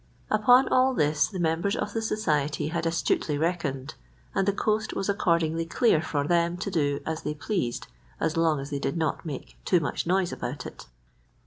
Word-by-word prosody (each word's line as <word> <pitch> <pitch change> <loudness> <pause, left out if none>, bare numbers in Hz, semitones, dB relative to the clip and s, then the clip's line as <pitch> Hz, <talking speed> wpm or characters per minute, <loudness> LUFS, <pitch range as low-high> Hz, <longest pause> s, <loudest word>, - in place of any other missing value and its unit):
Upon 245 +5 +5
all 255 0 +3
this 150 -3 +2
the 195 - -7
members 170 +4 0
of - - -3
the 225 - -1
society 155 -10 0
had 165 0 -1
astutely 165 -2 0
reckoned, 150 -5 -2 0.4
and 195 - +1
the - - +5
coast 215 +2 -1
was 195 - -2
accordingly 165 -4 +1
clear 220 -4 +3
for 145 -3 -1
them 170 0 +2
to 195 +3 -4
do 145 -5 0
as 160 0 -3
they 150 - -3
pleased 155 - -2 0.3
as 160 - 0
long 165 -3 +2
as 140 +2 -7
they 140 - -2
did 170 - -2
not 160 0 -1
make 140 -4 -7
too 180 - +3
much 155 +1 -3
noise 185 0 +2
about 125 +2 -5
it. - - -10
165 Hz, 190 wpm, -27 LUFS, 150-195 Hz, 0.4 s, Upon